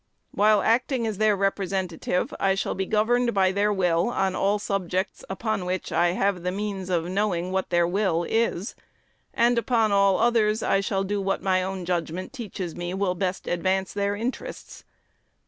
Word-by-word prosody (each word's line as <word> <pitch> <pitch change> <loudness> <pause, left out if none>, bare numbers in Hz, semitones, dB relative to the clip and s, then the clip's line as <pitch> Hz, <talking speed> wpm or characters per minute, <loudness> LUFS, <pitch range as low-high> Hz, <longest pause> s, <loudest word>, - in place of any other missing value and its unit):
While 210 0 +3
acting 245 +1 +1
as 215 -3 -3
their 215 -1 +4
Representative, 190 -3 -1
I 195 0 +2
shall 195 - -1
be 190 0 -3
governed 235 +2 +2
by 190 -1 +3
their 205 +2 +1
will 180 -1 +1
on 195 -5 0
all 200 +2 +2
subjects 195 -2 -2
upon 215 0 -2
which 180 0 -3
I 175 +1 +2
have 195 -1 0
the 180 +1 -2
means 195 -1 -4
of 170 -2 0
knowing 185 -1 -1
what 190 0 -1
their 175 -1 +3
will 180 -2 +1
is; 225 -3 0 0.6
and 235 0 +3
upon 225 -3 +1
all 200 -1 +4
others 225 -2 +2
I 195 - +2
shall 195 0 -1
do 200 +1 -2
what 195 -1 -1
my 185 -1 +2
own 190 -1 -4
judgment 175 - -3
teaches 195 -9 -6
me 175 +1 -4
will 190 -2 0
best 185 +1 -3
advance 190 +2 -1
their 200 0 0
interests. 255 - -6
195 Hz, 175 wpm, -25 LUFS, 185-210 Hz, 0.6 s, their